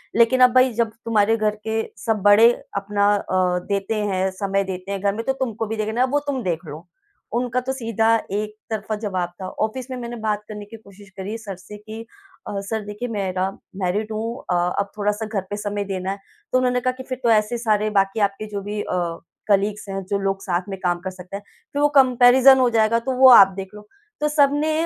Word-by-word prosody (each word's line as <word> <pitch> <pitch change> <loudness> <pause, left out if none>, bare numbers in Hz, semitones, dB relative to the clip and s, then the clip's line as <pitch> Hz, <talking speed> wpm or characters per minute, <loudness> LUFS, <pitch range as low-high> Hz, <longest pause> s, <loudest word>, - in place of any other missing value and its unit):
लेकिन 235 +3 +4
अब 250 0 +7
भई 255 0 +5
जब 230 0 0
तुम्हारे 225 -1 +3
घर 210 -1 0
के 220 0 0 0.2
सब 220 -3 0
बड़े 215 +3 +7 0.3
अपना 200 0 0
अ, 185 -2 0
देते 200 +2 -1
हैं 190 -2 0
समय 195 +1 -1
देते 190 0 -6
हैं 195 -1 -3
घर 200 0 +1
में, 225 - -3
तो 265 - +1
तुमको 235 -5 -3
भी 225 - -3
देखना 220 +3 -1
है 255 - +4
वो 290 +3 +1
तुम 270 -3 -1
देख 175 -2 -2
लो, 155 +4 -9 0.5
उनका 250 0 0
तो 265 +1 -3
सीधा 230 -3 +1 0.2
एक 210 +1 -3
तरफा 215 -1 -3
जवाब 185 -5 -2
था। 185 - -4 0.2
ऑफिस 250 +4 -4
में - - -3
मैंने 240 -1 -6
बात 210 -1 -1
करने 210 -1 -8
की 225 +2 -11
कोशिश 200 -2 -17
करी 200 +4 -4
सर 210 -4 -7
से 200 +3 -12
कि 215 +2 -9 0.5
अ, 200 - -3
सर 220 +2 -2
देखिए, 210 +4 -5
मेरा 190 -3 -1 0.3
मैरिड 205 +4 -1
हूँ 225 +3 -3
अ, - - +2 0.2
अब 200 0 -2
थोड़ा-सा 210 +1 -1
घर 215 -2 -2
पे 205 - -3
समय 205 0 -3
देना 190 -1 -3
है, 195 - -4 0.3
तो - - +3
उन्होंने 250 -1 +2
कहा 255 - +1
कि 260 - -7
फिर 255 - -3
तो 235 - +3
ऐसे 215 +2 +2
सारे 215 -2 +1
बाकी 195 +3 0
आपके 200 +2 -9
जो 200 - -2
भी 205 +1 -4
अ, - - -3 0.5
कलीग्स 205 +1 +1
हैं, 195 0 -4
जो 200 +1 -1
लोग 195 0 -1
साथ 175 -2 -1
में 195 -1 -5
काम 175 -1 +1
कर 190 - -5
सकते 185 +1 -10
हैं 205 - -12 0.3
फिर 285 - 0
वो 295 - +5
कंपैरिज़न 255 +1 +6
हो 250 -1 +4
जाएगा, 230 0 +3
तो 235 +3 -3
वो 260 0 +8
आप 200 -6 +10
देख 195 -1 -6
लो। 210 0 -12 0.3
तो 300 - +2
सबने 295 +1 +2
210 Hz, 225 wpm, -22 LUFS, 195-235 Hz, 0.5 s, आप